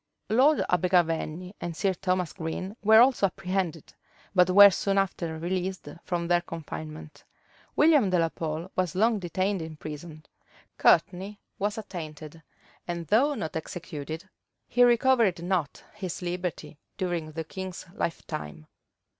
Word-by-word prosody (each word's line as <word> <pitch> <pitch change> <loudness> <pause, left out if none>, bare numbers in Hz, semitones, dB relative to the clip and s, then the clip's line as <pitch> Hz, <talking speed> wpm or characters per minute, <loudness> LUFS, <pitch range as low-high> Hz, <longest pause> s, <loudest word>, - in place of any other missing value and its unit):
Lord 270 +6 +4
Abergavenny 180 0 +1
and 170 -2 -5
Sir 195 -2 +1
Thomas 185 -1 -1
Green 185 +3 -5
were 220 +2 +7
also 245 -5 +4
apprehended; 185 -4 -3 0.4
but 180 -1 +5
were 200 +2 +9
soon 195 +2 0
after 170 -4 -1
released 185 +1 -3 0.2
from 170 -1 -2
their 175 0 +3
confinement. 80 - -8 0.5
William 295 -9 +5
de 185 - +2
la 165 -1 +2
Pole 160 +3 -5
was 180 -3 -1
long 220 +2 +3
detained 185 +2 -1
in 160 -1 -7
prison: 155 +1 -8 0.5
Courtney 195 +3 +3 0.2
was 205 +2 -1
attainted, 160 -6 -8 0.5
and, 170 -1 -3
though 280 +7 +3
not 160 -10 -5
executed, 160 +1 -6 0.4
he 245 - +4
recovered 235 -7 +3
not 175 -6 -1
his 185 -4 -6
liberty 175 -3 -4 0.2
during 175 -5 -3
the 160 +1 -3
king's 190 +2 -7
lifetime. 75 - -5
180 Hz, 130 wpm, -27 LUFS, 160-195 Hz, 0.5 s, were